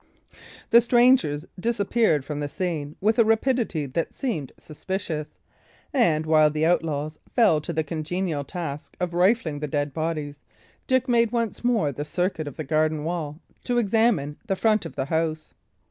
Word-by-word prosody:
The 235 - +8
strangers 240 - +3
disappeared 215 - +1
from 150 0 -4
the 145 - -2
scene 155 -4 -3
with 220 +4 +2
a - - +8
rapidity 225 - +1
that 150 +5 -3
seemed 170 - -3
suspicious; 155 -1 -5 0.6
and, 165 - +2
while 155 -1 +5
the 155 +1 0
outlaws 155 -3 0 0.2
fell 190 -11 +4
to 170 - -5
the 160 -1 0
congenial 160 0 -2
task 150 -2 -6
of 180 -2 -2
rifling 180 -4 +2
the 150 - -3
dead 145 0 -2
bodies, 155 -2 -3 0.5
Dick 260 0 +2
made 235 -2 +3
once 230 -2 -2
more 230 -11 +2
the 145 +2 -5
circuit 175 0 -2
of 145 - -7
the 155 - -3
garden 155 +1 0
wall 160 -2 -4 0.3
to 245 -1 0
examine 210 -10 +2
the 195 - +1
front 215 -3 +1
of - - -13
the 135 - -2
house. 160 0 -2
165 Hz, 160 wpm, -25 LUFS, 150-220 Hz, 0.6 s, The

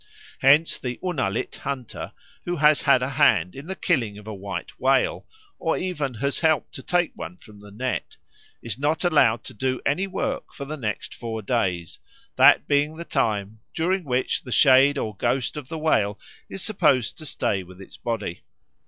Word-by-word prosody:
Hence 145 +5 +4
the 125 -1 -4
Unalit 130 - -2
hunter 135 -4 -5 0.3
who 175 - -1
has 150 -1 +4
had 125 - +4
a 130 - -1
hand 90 - +4
in 140 +4 -9
the 190 - -4
killing 110 - 0
of 105 - -12
a 110 - -6
white 100 0 -6
whale, - - +2 0.3
or 165 - 0
even 150 -9 -3
has 140 +5 -1
helped 160 -3 +1
to - - -7
take 175 +4 +1
one 90 - -8
from 105 +1 -16
the 105 0 -13
net, 125 +5 -4 0.5
is 115 0 -3
not 150 +3 +1
allowed 145 -10 +3
to - - -9
do 130 +3 -1
any 180 +8 +1
work 190 - -3
for 140 - -6
the 150 +2 -5
next 110 -8 -4
four 110 -2 -5
days, 90 -8 -1 0.4
that - - +6
being 145 +2 +1
the 170 - -6
time 110 -7 -1 0.2
during 185 +3 0
which 130 -3 0
the 125 - -10
shade 135 +2 +6
or 110 -6 -3
ghost 130 +6 0
of 150 -4 -6
the 160 - -4
whale 110 -10 +1 0.3
is 195 - -4
supposed 150 - +2
to 155 - -7
stay 100 -7 -1
with 90 0 -14
its 95 - -11
body. 105 -7 -4
130 Hz, 185 wpm, -24 LUFS, 110-155 Hz, 0.5 s, that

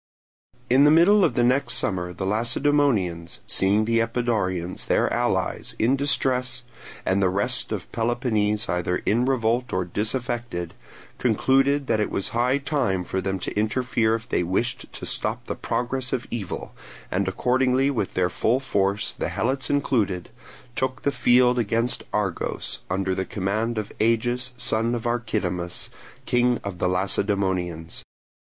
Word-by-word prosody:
In 130 +3 +5
the 150 - +7
middle 180 +6 +6
of 120 - +2
the 120 - +3
next 130 +3 +2
summer 90 -3 0
the 95 +2 -5
Lacedaemonians, 110 - +1
seeing 100 +3 +2
the 115 +1 +2
Epidaurians, 110 -7 -1
their - - +2
allies, - - -1
in 120 +5 +3
distress, 130 -2 0 0.4
and 95 +1 +2
the 95 - +3
rest 115 +6 +1
of 100 -6 -4
Peloponnese 115 -3 0
either 90 +1 -1
in 120 +4 +2
revolt 125 -1 +1
or 90 -1 0
disaffected, 110 -2 -3 0.5
concluded 135 +4 +2
that 110 - +1
it 105 - 0
was 95 - -1
high 125 +3 +2
time 135 -10 0
for 95 +2 -2
them 95 0 -2
to 90 - -5
interfere 110 +1 +1
if 115 0 -7
they - - 0
wished 95 +7 -2
to - - -7
stop - - -2
the - - -3
progress 125 +1 -2
of 125 - -1
the - - -17
evil, 95 -6 -6 0.4
and 95 +1 0
accordingly 130 +6 +2
with 110 -8 -2
their 90 -1 +1
full 120 +8 +1
force, 100 -5 0
the - - -3
Helots 130 +3 -1
included, 110 -11 0 0.5
took 130 0 -2
the 140 - +2
field 125 -1 +4
against 115 +2 0
Argos, 100 -4 -2
under 95 0 0
the 95 - -1
command 110 +5 -2
of 105 -2 -3
Agis, 120 +3 +1
son 115 +2 0
of 115 - -5
Archidamus, 100 -7 -2 0.3
king 125 -1 +2
of 100 -3 -6
the 90 - +1
Lacedaemonians. 90 -3 0
115 Hz, 150 wpm, -24 LUFS, 95-125 Hz, 0.5 s, the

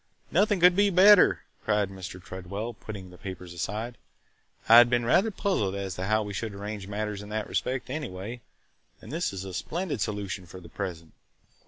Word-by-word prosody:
"Nothing 205 -2 +3
could 180 +1 +6
be 205 +1 +4
better!" 195 +2 +6 0.2
cried 105 -2 +1
Mr. 95 -1 -8
Tredwell, 95 +6 -6
putting 100 -4 -9
the 90 - -15
papers 90 -3 -7
aside. 110 +7 -4 0.7
"I 115 - +9
had 120 0 +8
been 120 -1 +1
rather 190 - +4
puzzled 185 - -1
as 100 -1 -3
to 90 +2 -4
how 110 +2 +2
we 105 -1 -6
should 105 +1 -4
arrange 100 0 -6
matters 105 0 -3
in 105 - -10
that 110 0 -2
respect, 130 0 -2
anyway, 120 -5 -5 0.6
and - - -11
this 170 +4 -1
is 95 -1 -6
a 95 - -7
splendid 165 - -3
solution 100 -3 -3
for 95 - -10
the 85 -2 -13
present. 85 -2 -6
105 Hz, 185 wpm, -27 LUFS, 95-120 Hz, 0.7 s, I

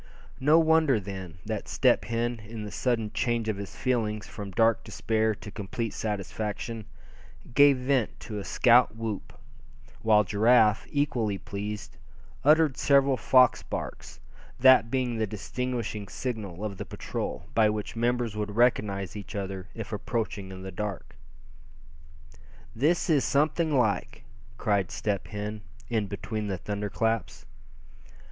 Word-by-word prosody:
No 150 +4 +5
wonder 160 -6 +4
then, 95 -4 -7
that 110 -1 -4
Step - - +3
Hen, 120 0 -1
in 105 +1 -8
the 105 - -6
sudden 115 -4 -1
change 120 -3 0
of 110 -2 -1
his 100 -1 -7
feelings 110 -4 -1
from 100 -3 -7
dark 115 +4 +2
despair 110 -1 0
to 105 -1 -10
complete 105 +3 -4
satisfaction, 105 - -4 0.7
gave 140 0 +6
vent 130 -2 0
to 105 -2 -5
a - - -5
scout 120 -1 +4
whoop; 115 -3 -4 0.7
while 105 -1 +5
Giraffe, 110 +2 +4
equally 120 -9 0
pleased, 105 +2 -6 0.5
uttered 150 -1 +4
several 140 -1 +4
fox 130 0 +4
barks, - - -6 0.4
that 130 -2 +7
being 125 -2 -1
the 110 - +1
distinguishing 110 0 -4
signal 105 -6 -5
of 100 -3 -5
the 100 - -5
patrol, 85 - -5
by 110 -2 +4
which 105 +1 -4
members 120 -1 0
would 105 -1 -3
recognize 105 -6 +1
each 105 +1 -8
other 95 -2 -4
if 110 -1 -6
approaching 105 -3 -3
in 95 0 -8
the 95 - -6
dark. 100 -5 -5 1.6
"This 155 +9 +2
is 150 -5 +3
something 155 +3 +1
like!" 105 -7 0 0.3
cried 100 -3 +1
Step 100 -3 -2
Hen, 105 0 -5 0.3
in 110 -4 0
between 105 +2 -4
the 95 -2 -2
thunder 105 +3 -4
claps. 115 +2 -1
110 Hz, 140 wpm, -28 LUFS, 100-125 Hz, 1.6 s, that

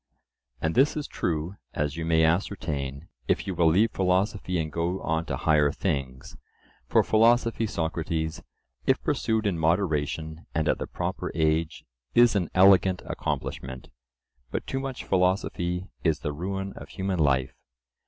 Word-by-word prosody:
And 80 +2 0
this 140 +4 +3
is 150 - -2
true, 85 +3 -2 0.2
as 75 0 -1
you 80 0 -3
may 80 0 +3
ascertain, 80 -5 -1 0.2
if - - +1
you 95 - -2
will 85 -1 +3
leave 100 +8 +4
philosophy 95 0 0
and 80 -2 -2
go 85 +4 -1
on 80 0 -1
to 80 - -3
higher 75 -2 +3
things: 70 -7 -3 0.5
for - - +4
philosophy, 115 0 +3
Socrates, 80 -2 -2 0.5
if - - +4
pursued 110 -1 0
in 95 -5 0
moderation 80 -2 0
and 80 - +1
at - - +1
the - - -4
proper - - -3
age, 80 0 0 0.3
is 120 -2 +6
an 90 -5 0
elegant 95 -1 +5
accomplishment, 65 0 -4 0.6
but - - -3
too 135 - -2
much 135 -1 -5
philosophy 90 -1 0 0.2
is 80 -3 +1
the 75 - -2
ruin 95 +5 -4
of - - -10
human 95 -2 -2
life. 65 -4 +2
85 Hz, 150 wpm, -27 LUFS, 80-95 Hz, 0.6 s, is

